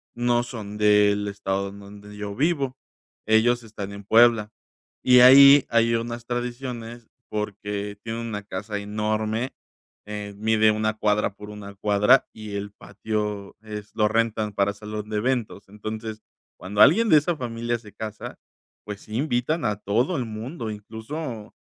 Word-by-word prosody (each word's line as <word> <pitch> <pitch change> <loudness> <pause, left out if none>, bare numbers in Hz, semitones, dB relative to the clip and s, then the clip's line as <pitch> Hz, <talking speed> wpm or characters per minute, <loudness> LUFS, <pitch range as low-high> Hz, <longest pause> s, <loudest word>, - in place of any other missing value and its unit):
no 120 0 +2
son 105 -4 -7
del 105 -1 +3
estado 100 -1 -2
en 100 +1 -12
donde 105 +1 -12
yo 100 -1 -5
vivo. 140 -3 0 0.5
Ellos 120 +2 +3
están 105 -3 -7
en 100 - -9
Puebla. 115 -1 +5 0.5
Y 125 0 +7
ahí 140 +2 +9
hay 115 0 +3
unas 115 0 -4
tradiciones, 120 -1 -5 0.2
porque 105 -1 -4
tienen 115 +1 -4
una 105 -2 -5
casa 105 +1 -5
enorme. 110 +3 -2 0.5
Eh, 105 -1 -6
mide 110 0 +3
una 110 0 -1
cuadra 105 -1 +1
por 105 0 -11
una 100 -1 -10
cuadra. 105 +6 +3
Y 105 -2 -8
el 100 0 -4
patio 105 -1 -4
es 105 -1 -8
lo 105 -1 +3
rentan 110 -1 0
para 100 0 +1
salón 105 0 -7
de 105 - -2
eventos. 115 -4 -2
Entonces, 110 +1 -7 0.3
cuando 100 +3 -1
alguien, 220 +10 +6
de 155 - +7
esa 165 +3 +1
familia 120 -1 -3
se 105 -3 -15
casa, 110 -1 -7 0.5
pues, 105 -1 -7
sí 110 - -9
invitan 140 +4 0
a 105 - +1
todo 115 - 0
el 125 - -2
mundo. 115 +2 -6
Incluso, 110 +3 -7
110 Hz, 150 wpm, -24 LUFS, 105-120 Hz, 0.5 s, ahí